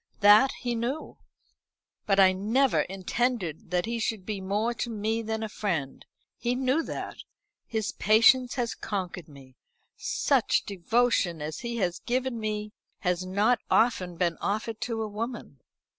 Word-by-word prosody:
That 210 +6 +7
he 245 -1 -1
knew. 240 +7 -3 0.9
But 195 -1 +3
I 190 -1 +7
never 230 +8 +2
intended 195 - -2
that 180 0 0
he 230 +1 -2
should 215 -3 -2
be 205 -2 -4
more 210 +5 0
to 240 - -3
me 220 +1 -1
than 220 0 -3
a - - -2
friend. 175 -10 -3 0.4
He 245 0 0
knew 260 +4 +1
that. - - -6 0.5
His 220 -2 -2
patience 235 +4 +4
has 240 -2 -1
conquered 185 -5 -4
me. 135 -3 -15 0.4
Such 270 -5 +1
devotion 200 -2 +1
as 150 +1 -5
he 235 -1 -4
has 180 -5 -1
given 250 -1 -1
me 210 -1 -3 0.3
has 180 -1 0
not 210 +6 +2
often 185 -7 +2
been 170 -1 0
offered 220 +2 -2
to 230 -2 -2
a - - -3
woman. 215 - -6
215 Hz, 150 wpm, -27 LUFS, 185-235 Hz, 0.9 s, That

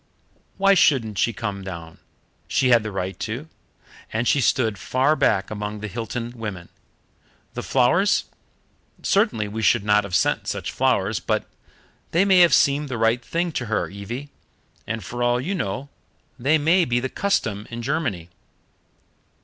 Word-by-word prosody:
"Why 195 0 +5
shouldn't 115 - +3
she 115 - +2
come 100 -2 -5
down? 85 -4 -8 0.5
She 130 -2 +2
had 120 -2 +6
the 110 0 -5
right 95 0 -4
to, 120 +8 -4 0.6
and 115 +2 -1
she 140 - +3
stood 115 -5 +1
far 130 +10 +2
back 105 -10 +1
among 105 0 -4
the 105 - -5
Hilton 115 +3 -5
women. 100 -7 -6 0.8
The - - -4
flowers 135 +11 +3 0.8
certainly 195 - +2
we 110 +2 -5
should 110 0 +3
not 105 0 +3
have 95 -3 -3
sent - - +1
such - - -3
flowers, - - +1
but - - -1 0.7
they 175 +4 +4
may 190 -2 +5
have 170 -6 +7
seemed 145 +1 +2
the 125 - -3
right 115 +2 +2
thing 170 +7 -1
to 125 -5 -3
her, 110 - -1
Evie, 120 +9 -7 0.6
and 115 0 -3
for 120 +6 -6
all 120 0 +2
you 165 +10 -2
know 130 - -3 0.5
they 145 +6 +3
may 165 +5 +3
be 120 -5 +1
the 130 - -2
custom 110 - -1
in 120 0 -6
Germany. 120 - -2
120 Hz, 160 wpm, -23 LUFS, 105-145 Hz, 0.8 s, have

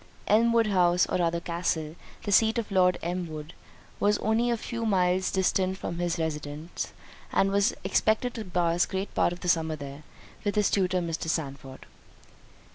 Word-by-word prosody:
Elmwood 230 +2 +4
House, 180 -3 +3
or - - -1
rather 170 -1 +1
Castle, 170 -2 -2 0.3
the 205 - -3
seat 220 +3 +4
of 230 -3 -3
Lord 180 -2 +4
Elmwood, 165 -3 -4 0.5
was 205 0 +3
only 225 +3 +1
a 235 - +1
few 230 +1 -5
miles 185 -3 +2
distant 190 0 +1
from 170 - -5
this 175 -1 -1
residence, 155 0 -4 0.4
and 195 - +3
he - - -3
was 200 +1 +2
expected 220 +3 +1
to 225 - -5
pass 175 -2 +1
great 190 +1 -4
part - - +2
of 175 - -7
the - - -5
summer 160 -2 +2
there, 140 -1 -8 0.4
with 205 0 -1
his 210 -1 +2
tutor, 185 -2 +1
Mr. 165 -1 -3
Sandford. 135 -4 -4
180 Hz, 170 wpm, -27 LUFS, 165-205 Hz, 0.5 s, Elmwood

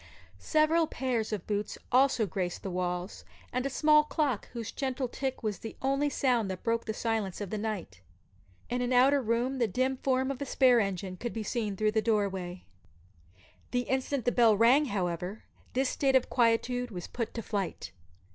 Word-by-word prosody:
Several 315 +1 +3
pairs 245 -6 -2
of 205 -5 -3
boots 205 0 -2
also 255 -3 +4
graced 180 -1 -3
the 195 - -4
walls, 180 +1 -3 0.3
and 255 +2 0
a - - -3
small 300 +2 +5
clock, 295 -7 -1
whose 230 -2 -6
gentle 265 -2 -2
tick 265 +1 -4
was 210 -4 -2
the 225 - -7
only 275 +2 +1
sound 245 -7 +1
that 185 - -5
broke 230 0 0
the 220 - -2
silence 220 -5 -2
of 205 -3 -5
the 215 - -2
night. 195 - -4 0.7
In 245 +1 -2
an 245 +1 0
outer 270 +3 +5
room 245 +3 0
the 235 - +3
dim 255 +6 0
form 260 0 +1
of 275 0 -6
a - - -1
spare 250 -2 +5
engine 190 -2 -2
could 240 +5 -4
be 225 - -3
seen 215 -2 -2
through 215 +1 +2
the 220 0 +1
doorway. 195 -5 -1 1.1
The 245 - 0
instant 265 0 -1
that 245 - +3
the - - -9
bell 230 -4 +5
rang, 250 +7 +5
however, 185 - -3 0.3
this 260 +1 +1
state 270 -2 +1
of 260 - +2
quietude 245 +1 +2
was 180 -5 -6
put 230 -2 -5
to 230 - -4
flight. 195 - -3
235 Hz, 190 wpm, -30 LUFS, 205-260 Hz, 1.1 s, small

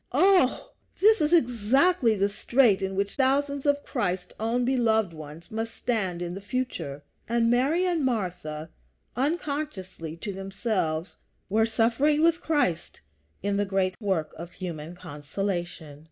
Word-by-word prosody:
Ah! 360 -2 +4 0.3
this 435 -2 +5
is 300 +1 +2
exactly 250 - +3
the 200 0 +2
strait 215 0 +3
in 190 0 -2
which 200 +1 -1
thousands 280 +1 +1
of 285 0 +2
Christ's 180 -7 -2
own 235 +3 0
beloved 220 -7 +2
ones 155 +1 -11
must 225 +1 -4
stand 190 -7 -1
in 175 0 -4
the 195 - -7
future; 200 - -4 0.3
and 230 0 +2
Mary 285 +9 +2
and 345 -4 +1
Martha, 175 -10 -3 0.4
unconsciously 265 - -3
to 200 +3 -4
themselves, 195 -4 -2 0.3
were 220 +3 +3
suffering 240 +7 +2
with 335 0 +3
Christ 235 - 0 0.4
in 200 0 0
the 205 - +2
great 190 -1 0
work 185 -7 -1
of 170 +2 -8
human 170 -2 -6
consolation. 175 -1 -5
215 Hz, 140 wpm, -27 LUFS, 180-265 Hz, 0.4 s, this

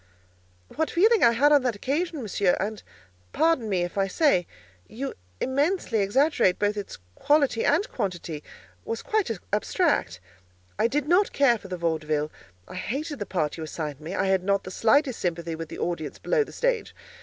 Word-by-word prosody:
"What 320 - +1
feeling 435 +6 +4
I 235 - +6
had 285 +6 +4
on 290 -1 +6
that 250 -3 -1
occasion, 295 - -2
Monsieur—and 200 +1 0 0.5
pardon 315 -8 +2
me, 185 -3 +1
if 175 +3 -3
I 195 - +2
say, 195 - +2 0.4
you 265 +5 -5 0.3
immensely 280 - 0
exaggerate 205 - +2
both 205 0 +1
its 205 -1 -6 0.2
quality 280 - +2
and 335 +8 +2
quantity—was 155 - -6
quite 430 -2 0 0.2
abstract. 210 - +1 0.6
I - - +4
did 290 +4 -1
not 365 +5 +3
care 260 -5 +4
for 195 - -11
the 185 -1 -5
vaudeville. 155 -2 -1 0.4
I - - -10
hated 285 - -4
the 205 - -4
part 160 -6 -1
you 160 - -5
assigned 155 -2 -5
me. 165 +5 -5
I - - +1
had 190 -1 +2
not 200 0 +1
the 185 - -8
slightest 255 +5 +2
sympathy 170 -2 -2
with 165 0 -6
the - - -7
audience 170 -3 -3
below - - +1
the - - -12
stage. - - -1
215 Hz, 170 wpm, -26 LUFS, 175-290 Hz, 0.6 s, I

